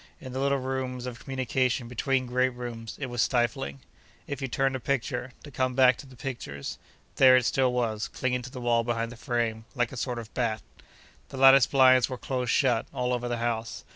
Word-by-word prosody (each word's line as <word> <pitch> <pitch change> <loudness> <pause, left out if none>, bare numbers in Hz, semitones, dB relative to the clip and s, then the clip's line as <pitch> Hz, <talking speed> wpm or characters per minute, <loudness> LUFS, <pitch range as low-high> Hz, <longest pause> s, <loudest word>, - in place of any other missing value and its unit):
In 130 -2 -9
the 130 - -3
little 140 0 +2
rooms 130 -1 -3
of 120 -1 -6
communication 130 -2 -1
between 130 +2 0
great 125 +1 +1
rooms, 120 -3 -7
it 140 - -2
was 120 -2 -2
stifling. 115 - 0 0.4
If 140 -1 -5
you 135 - -1
turned 135 +2 0
a - - -3
picture—to 130 +1 -3
come 130 -1 -1
back 130 -1 +6
to 140 - -11
the 130 - -15
pictures—there 130 - 0
it 125 - +1
still 130 0 +2
was, 115 -4 -1
clinging 125 -1 -2
to 125 - -8
the 130 -1 -8
wall 120 -1 +2
behind 115 0 -2
the - - -9
frame, 115 -2 -2
like 120 -2 0
a 130 - -8
sort 125 0 -2
of 115 -2 -8
bat. 115 -3 -1 0.7
The - - -8
lattice 135 -1 +7
blinds 130 -2 +5
were 130 - -4
close 125 -1 -3
shut, 120 -4 +2
all 125 0 -1
over 125 0 -2
the 120 -1 -2
house. 115 -1 -3
125 Hz, 200 wpm, -27 LUFS, 120-130 Hz, 0.7 s, lattice